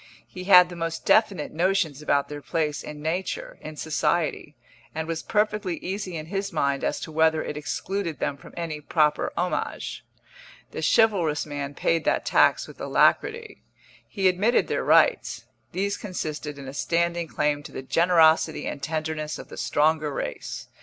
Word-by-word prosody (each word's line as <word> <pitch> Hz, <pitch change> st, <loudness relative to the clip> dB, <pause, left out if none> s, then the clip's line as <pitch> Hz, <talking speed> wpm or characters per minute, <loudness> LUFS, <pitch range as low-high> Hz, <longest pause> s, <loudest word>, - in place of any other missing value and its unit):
He 185 Hz, 0 st, -9 dB
had 180 Hz, -2 st, +8 dB
the 175 Hz, -, -8 dB
most 165 Hz, -1 st, -4 dB
definite 200 Hz, -8 st, +3 dB
notions 170 Hz, -4 st, 0 dB
about 145 Hz, -2 st, +1 dB
their 145 Hz, 0 st, -7 dB
place 150 Hz, -1 st, -1 dB
in 150 Hz, 0 st, -9 dB
nature, 175 Hz, +4 st, -3 dB
in 155 Hz, 0 st, -8 dB
society, 155 Hz, 0 st, -1 dB, 0.4 s
and 160 Hz, 0 st, -3 dB
was 165 Hz, -1 st, -3 dB
perfectly 210 Hz, -4 st, 0 dB
easy 190 Hz, -2 st, -4 dB
in 155 Hz, -, -6 dB
his 195 Hz, +3 st, -3 dB
mind 140 Hz, -3 st, 0 dB
as -, -, -1 dB
to 160 Hz, -, -6 dB
whether 160 Hz, 0 st, +3 dB
it -, -, -5 dB
excluded 170 Hz, +3 st, -3 dB
them 140 Hz, -, -2 dB
from -, -, -14 dB
any 160 Hz, -3 st, -4 dB
proper 150 Hz, 0 st, +1 dB
homage. 180 Hz, +1 st, -2 dB, 0.7 s
The -, -, -5 dB
chivalrous 180 Hz, -10 st, +3 dB
man 145 Hz, -1 st, -5 dB
paid 165 Hz, +2 st, +1 dB
that -, -, +1 dB
tax -, -, +3 dB
with -, -, -13 dB
alacrity. 440 Hz, -1 st, +1 dB, 0.5 s
He 195 Hz, -2 st, +1 dB
admitted 200 Hz, +6 st, +2 dB
their -, -, -1 dB
rights; -, -, +3 dB, 0.3 s
these 200 Hz, +2 st, -1 dB
consisted 155 Hz, -6 st, -5 dB
in 140 Hz, -1 st, -9 dB
a 135 Hz, -, -7 dB
standing 170 Hz, +3 st, 0 dB
claim 145 Hz, +3 st, 0 dB
to -, -, -11 dB
the 130 Hz, -, -6 dB
generosity 160 Hz, +1 st, +3 dB
and 140 Hz, -, -5 dB
tenderness 155 Hz, 0 st, -3 dB
of -, -, -10 dB
the -, -, -9 dB
stronger 155 Hz, 0 st, +1 dB
race. -, -, -5 dB
160 Hz, 165 wpm, -25 LUFS, 150-180 Hz, 0.7 s, had